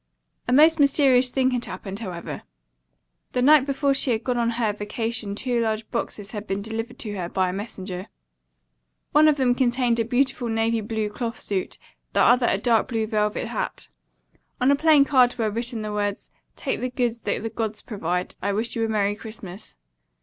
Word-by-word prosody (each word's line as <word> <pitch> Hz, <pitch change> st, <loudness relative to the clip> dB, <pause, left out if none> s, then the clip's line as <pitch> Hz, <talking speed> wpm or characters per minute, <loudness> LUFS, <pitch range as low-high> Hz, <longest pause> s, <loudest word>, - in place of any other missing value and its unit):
A -, -, 0 dB
most 310 Hz, +5 st, +6 dB
mysterious 270 Hz, -3 st, +4 dB
thing 260 Hz, 0 st, +1 dB
had 245 Hz, -1 st, -1 dB
happened, 195 Hz, 0 st, -7 dB
however. 180 Hz, -6 st, -6 dB, 0.9 s
The 250 Hz, -, +1 dB
night 290 Hz, 0 st, +6 dB
before 275 Hz, 0 st, +1 dB
she 270 Hz, -, +1 dB
had 225 Hz, -2 st, 0 dB
gone 250 Hz, -2 st, 0 dB
on 235 Hz, -1 st, +2 dB
her 220 Hz, -3 st, +1 dB
vacation 210 Hz, 0 st, -3 dB
two 245 Hz, +1 st, 0 dB
large 220 Hz, -1 st, -1 dB
boxes 205 Hz, -1 st, -4 dB
had 210 Hz, -1 st, -6 dB
been 195 Hz, +1 st, -2 dB
delivered 225 Hz, +2 st, -5 dB
to 210 Hz, -3 st, -5 dB
her 175 Hz, -2 st, -3 dB
by 185 Hz, 0 st, 0 dB
a -, -, -3 dB
messenger. 190 Hz, -2 st, -6 dB, 1.0 s
One 305 Hz, +1 st, +6 dB
of 300 Hz, -1 st, +4 dB
them 255 Hz, -3 st, +3 dB
contained 245 Hz, -2 st, +1 dB
a -, -, +3 dB
beautiful 250 Hz, +1 st, 0 dB
navy 225 Hz, 0 st, +1 dB
blue 215 Hz, 0 st, -2 dB
cloth 230 Hz, +2 st, -4 dB
suit, 190 Hz, -3 st, -3 dB, 0.4 s
the -, -, +3 dB
other 245 Hz, 0 st, +5 dB
a -, -, +2 dB
dark 225 Hz, +1 st, +2 dB
blue 225 Hz, -3 st, -1 dB
velvet 210 Hz, -1 st, -1 dB
hat. -, -, -4 dB, 0.7 s
On 255 Hz, +2 st, +4 dB
a -, -, +5 dB
plain 300 Hz, -1 st, +5 dB
card 255 Hz, -3 st, +4 dB
were 220 Hz, -3 st, 0 dB
written 235 Hz, 0 st, -3 dB
the 210 Hz, 0 st, -4 dB
words, 205 Hz, -1 st, -3 dB, 0.2 s
"'Take -, -, -3 dB
the 255 Hz, -, -1 dB
goods 240 Hz, -2 st, -1 dB
the 225 Hz, +2 st, -2 dB
gods 220 Hz, -1 st, -3 dB
provide.' 180 Hz, -4 st, -3 dB
I 200 Hz, -, 0 dB
Wish 225 Hz, +3 st, 0 dB
you 230 Hz, -, 0 dB
a 225 Hz, -, 0 dB
Merry 205 Hz, -1 st, +1 dB
Christmas." 215 Hz, -, -9 dB
230 Hz, 190 wpm, -24 LUFS, 210-250 Hz, 1.0 s, most